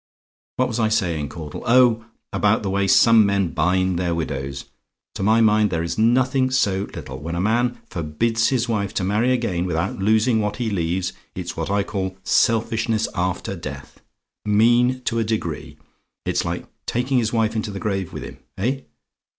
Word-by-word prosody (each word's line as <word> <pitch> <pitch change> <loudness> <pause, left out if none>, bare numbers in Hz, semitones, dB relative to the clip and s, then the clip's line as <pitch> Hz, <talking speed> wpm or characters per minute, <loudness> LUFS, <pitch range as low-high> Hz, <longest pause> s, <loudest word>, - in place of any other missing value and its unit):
"What 130 - +1
was 120 -1 -3
I 110 -1 +2
saying, 85 -10 0
Caudle? 80 -3 -7
Oh, 115 -2 +4 0.3
about 105 +1 +2
the 95 - -2
way 100 0 +1
some 115 +2 +6
men 100 -3 +1
bind 95 +1 +1
their 85 -2 0
widows. 70 -4 -4 0.5
To - - -6
my 110 +3 +4
mind, 105 -1 +4
there 85 -2 -1
is 85 +5 -3
nothing 130 +3 +3
so 100 -6 +1
little. 65 +1 -7
When 85 +3 -5
a - - -2
man 120 +5 +1
forbids 110 +9 0
his 125 -3 0
wife 100 -4 -2
to - - 0
marry 105 +6 +1
again 100 -8 0
without 90 +7 -2
losing 110 +3 +3
what 105 -1 -1
he 120 -3 -2
leaves 90 0 -1 0.2
it's 90 -1 -5
what 80 +1 -3
I 100 0 +1
call 95 -2 -4
selfishness 115 0 +1
after 90 -1 -2
death. - - -8 0.4
Mean 120 +4 +3
to 115 -1 -1
a - - +2
degree! 110 0 -3 0.5
It's - - 0
like - - -3 0.2
taking 125 +2 +1
his 115 -1 0
wife 115 -1 +1
into 110 -1 -2
the 100 -1 -6
grave 95 -4 -2
with - - -6
him. - - -10 0.2
Eh? 130 +8 0
105 Hz, 180 wpm, -22 LUFS, 95-115 Hz, 0.5 s, some